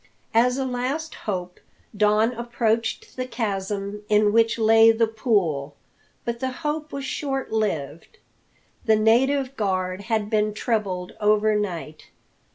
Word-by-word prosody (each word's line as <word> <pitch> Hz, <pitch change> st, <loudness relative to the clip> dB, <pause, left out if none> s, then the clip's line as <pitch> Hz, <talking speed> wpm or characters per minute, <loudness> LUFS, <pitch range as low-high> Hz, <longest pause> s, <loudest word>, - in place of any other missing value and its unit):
As 245 Hz, +3 st, +3 dB
a 270 Hz, -, -1 dB
last 260 Hz, +6 st, -3 dB
hope 180 Hz, -3 st, -5 dB, 0.4 s
Don 210 Hz, +2 st, +3 dB
approached 230 Hz, -1 st, -2 dB
the 255 Hz, 0 st, -3 dB
chasm 205 Hz, -3 st, -3 dB
in 210 Hz, 0 st, +4 dB
which 230 Hz, 0 st, +3 dB
lay 225 Hz, 0 st, +6 dB
the 225 Hz, 0 st, +2 dB
pool. 195 Hz, -, 0 dB, 0.5 s
But 235 Hz, 0 st, -3 dB
the 260 Hz, -, -1 dB
hope 300 Hz, +2 st, -4 dB
was 275 Hz, -1 st, -5 dB
short 270 Hz, -1 st, -3 dB
lived. 170 Hz, -, -3 dB, 0.7 s
The 220 Hz, -, +5 dB
native 260 Hz, +5 st, +2 dB
guard 185 Hz, -3 st, -1 dB
had 220 Hz, -3 st, 0 dB
been 210 Hz, -1 st, 0 dB
trebled 195 Hz, -6 st, -2 dB
overnight. 210 Hz, -6 st, 0 dB
220 Hz, 125 wpm, -24 LUFS, 205-245 Hz, 0.7 s, lay